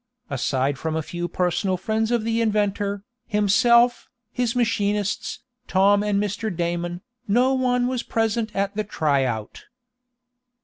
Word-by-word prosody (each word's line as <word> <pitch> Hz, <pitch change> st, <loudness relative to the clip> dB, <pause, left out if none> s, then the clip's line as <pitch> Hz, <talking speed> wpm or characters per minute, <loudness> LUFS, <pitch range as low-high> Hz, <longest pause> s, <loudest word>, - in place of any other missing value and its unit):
Aside 135 Hz, 0 st, 0 dB
from 160 Hz, -1 st, -2 dB
a 160 Hz, -, -1 dB
few 175 Hz, +2 st, -4 dB
personal 180 Hz, +2 st, 0 dB
friends 220 Hz, +4 st, -1 dB
of 240 Hz, -2 st, +1 dB
the 230 Hz, +1 st, 0 dB
inventor, 205 Hz, -2 st, 0 dB, 0.2 s
himself, 235 Hz, +4 st, +3 dB, 0.2 s
his 245 Hz, -2 st, -1 dB
machinists, 210 Hz, -3 st, -1 dB, 0.3 s
Tom 200 Hz, +2 st, +4 dB
and 205 Hz, -1 st, +1 dB
Mr. 210 Hz, +2 st, -2 dB
Damon, 175 Hz, 0 st, -3 dB, 0.3 s
no 245 Hz, +6 st, +3 dB
one 250 Hz, -1 st, +1 dB
was 250 Hz, -1 st, -1 dB
present 225 Hz, 0 st, -1 dB
at 200 Hz, +1 st, -1 dB
the 215 Hz, -, 0 dB
try 145 Hz, -9 st, +1 dB
out. 110 Hz, -4 st, -5 dB
205 Hz, 135 wpm, -23 LUFS, 175-225 Hz, 0.3 s, Tom